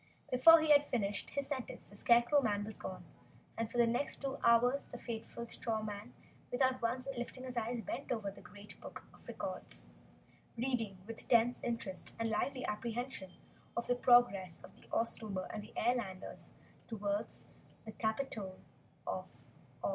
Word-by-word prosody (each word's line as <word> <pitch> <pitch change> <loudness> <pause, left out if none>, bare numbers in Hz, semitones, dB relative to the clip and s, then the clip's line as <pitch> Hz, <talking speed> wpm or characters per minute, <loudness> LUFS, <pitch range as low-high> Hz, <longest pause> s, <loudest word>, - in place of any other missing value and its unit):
Before 330 +7 +9
he 310 -1 +3
had 290 0 +7
finished 205 -4 -1
his 280 -1 -1
sentence 270 -3 -4
the 205 - -16
Scarecrow 240 +7 +5 0.2
was 215 0 -6
gone, 185 - -6 0.5
and 230 -1 -2
for - - -4
the 240 - +6
next 240 +5 0
two 275 0 -3
hours 245 +4 +5
the 245 - -8
faithful 235 0 -5
Straw 225 -1 -2
Man, 210 +2 -6 0.4
without 260 0 +2
once 255 +3 -1
lifting 245 +1 -5
his 255 -1 -6
eyes, 235 0 -1
bent - - -4
over 215 -5 -1
the - - -13
great 205 0 -12
book - - -8
of - - -19
records, - - -6 0.7
reading 230 -5 -1
with 230 +1 -7
tense 235 0 +4
interest 230 -6 -2
and 225 -1 0
lively 255 +4 0
apprehension 230 -1 -3 0.5
of 235 - 0
the 245 - +3
progress 240 -8 +4
of - - -13
the - - -19
Oztober 215 -4 -1
and 215 - -3
the 215 - -12
Airlanders 220 -6 -1 0.4
toward 205 -2 -1 0.6
the 220 - -6
Capitol 220 -4 -2 0.5
of - - -3 0.6
Oz. - - +1
235 Hz, 160 wpm, -35 LUFS, 210-250 Hz, 0.7 s, Before